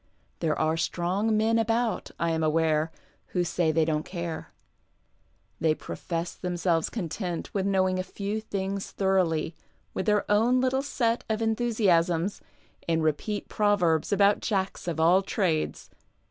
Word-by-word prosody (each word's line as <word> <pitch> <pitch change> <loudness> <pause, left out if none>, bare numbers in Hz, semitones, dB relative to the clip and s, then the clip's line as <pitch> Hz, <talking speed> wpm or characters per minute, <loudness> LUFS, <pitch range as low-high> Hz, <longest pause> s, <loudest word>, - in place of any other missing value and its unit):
There 155 -3 0
are 160 +1 +1
strong 190 +6 0
men 225 +1 +3
about, 225 0 0
I 170 0 +1
am 160 0 0
aware, 155 0 +2 0.5
who 175 - +3
say 175 -1 +1
they 160 0 +2
don't 155 -1 0
care. 170 -2 -5 1.1
They 160 -1 +2
profess 170 +1 -4
themselves 175 -2 0
content 175 -3 -4
with 195 -1 0
knowing 185 -1 +2
a - - 0
few 200 +3 -4
things 195 -2 -3
thoroughly, 175 -5 +1 0.4
with 190 - -3
their 210 -1 +3
own 230 +5 +3
little 260 +1 +1
set 235 -4 0
of 215 -1 0
enthusiasms, 205 -6 +1 0.5
and 165 -1 +1
repeat 160 +7 -1
proverbs 190 -7 +2
about 200 0 +4
jacks 190 -3 -2
of 165 -2 -2
all 175 +4 +5
trades. 185 -5 -1
185 Hz, 140 wpm, -27 LUFS, 165-210 Hz, 1.1 s, all